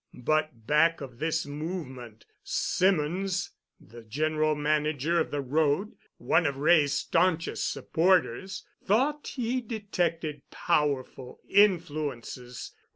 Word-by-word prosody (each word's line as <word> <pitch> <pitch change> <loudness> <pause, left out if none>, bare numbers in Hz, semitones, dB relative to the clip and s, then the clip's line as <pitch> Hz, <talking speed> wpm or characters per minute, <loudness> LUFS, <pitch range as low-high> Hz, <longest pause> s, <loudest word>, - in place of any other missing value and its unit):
But 155 -6 0
back 160 +5 +3
of 130 -4 -9
this 160 +1 0
movement, 145 - -6 0.2
Symonds, 185 +1 0 0.3
the 120 +2 -13
General 155 +6 0
Manager 150 +2 +1
of - - 0
the 145 - -2
road, 150 +8 +1 0.3
one 175 - +2
of 140 -1 -3
Wray's 145 -1 +4
staunchest 165 +1 +1
supporters, 185 +1 +1 0.2
thought 275 +9 +1
he 250 0 -1
detected 175 - -2
powerful 140 -5 -1
influences. 150 - 0
155 Hz, 100 wpm, -28 LUFS, 140-180 Hz, 0.3 s, Wray's